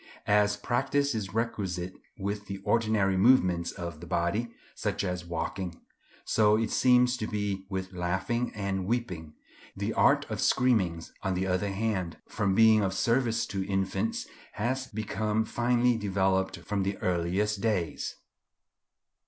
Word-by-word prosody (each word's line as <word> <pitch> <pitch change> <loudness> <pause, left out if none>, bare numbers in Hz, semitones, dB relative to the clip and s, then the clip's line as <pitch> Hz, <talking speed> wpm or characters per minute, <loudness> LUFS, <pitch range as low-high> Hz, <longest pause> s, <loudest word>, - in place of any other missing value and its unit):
As 105 0 +3
practice 135 +5 0
is 105 -4 -3
requisite 95 -5 -2 0.2
with 100 0 -4
the 100 - -4
ordinary 110 -4 +2
movements 95 -5 +4
of 85 -3 -6
the 85 - -10
body, 95 +7 0 0.2
such - - -2
as 90 -2 -2
walking, 85 +1 -4 0.5
so 105 -1 +4
it 110 -1 -1
seems 125 -1 +4
to 110 - -3
be 100 -2 -3
with 95 -1 -4
laughing 95 +7 -1
and 95 -2 -2
weeping. 90 -10 -3 0.4
The - - -2
art - - +4
of - - -2
screaming, 95 -10 +2 0.2
on 95 -1 -1
the 95 +1 0
other 95 +2 0
hand, 95 -4 -2
from 100 -3 0
being 110 0 +6
of 95 -1 0
service 115 +1 +1
to 95 -1 -1
infants, 100 - -1 0.3
has 130 +4 -1
become 110 0 -1
finely 120 +1 +2
developed 95 -2 0
from 105 -2 -2
the 95 +1 -1
earliest 95 +4 0
days. 100 -8 -1
100 Hz, 140 wpm, -29 LUFS, 95-115 Hz, 0.5 s, being